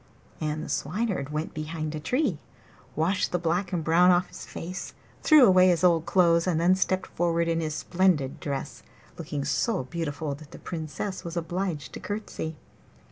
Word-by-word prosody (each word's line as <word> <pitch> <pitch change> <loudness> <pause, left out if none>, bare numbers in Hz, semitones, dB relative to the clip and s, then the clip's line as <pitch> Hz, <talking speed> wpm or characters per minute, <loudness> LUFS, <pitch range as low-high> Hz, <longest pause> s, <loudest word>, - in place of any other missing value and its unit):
And 155 0 -2
the - - -6
Swineherd 175 +1 -2
went 155 +2 -3
behind 155 0 -4
a 155 - -4
tree, 210 - 0 0.6
washed 180 +5 +1
the 180 - +1
black 175 +2 -1
and 175 -3 -1
brown 170 +3 +5
off 180 0 +3
his - - -10
face, 180 +3 -6 0.3
threw 305 -5 +7
away 185 -2 +6
his 175 -2 +2
old 170 -2 +4
clothes, 170 -1 +4
and 165 -3 +1
then 175 +2 +4
stepped 190 0 0
forward 170 -1 0
in 165 0 +1
his 155 -2 -2
splendid 165 -3 +1
dress, 140 -2 -4 0.4
looking 140 -2 -4
so 150 - 0
beautiful 150 0 -3
that 145 +1 -11
the - - -11
Princess 170 +4 -5
was 170 0 -5
obliged 170 -5 -3
to - - -6
courtesy. 205 -6 -5
170 Hz, 175 wpm, -27 LUFS, 155-185 Hz, 0.6 s, threw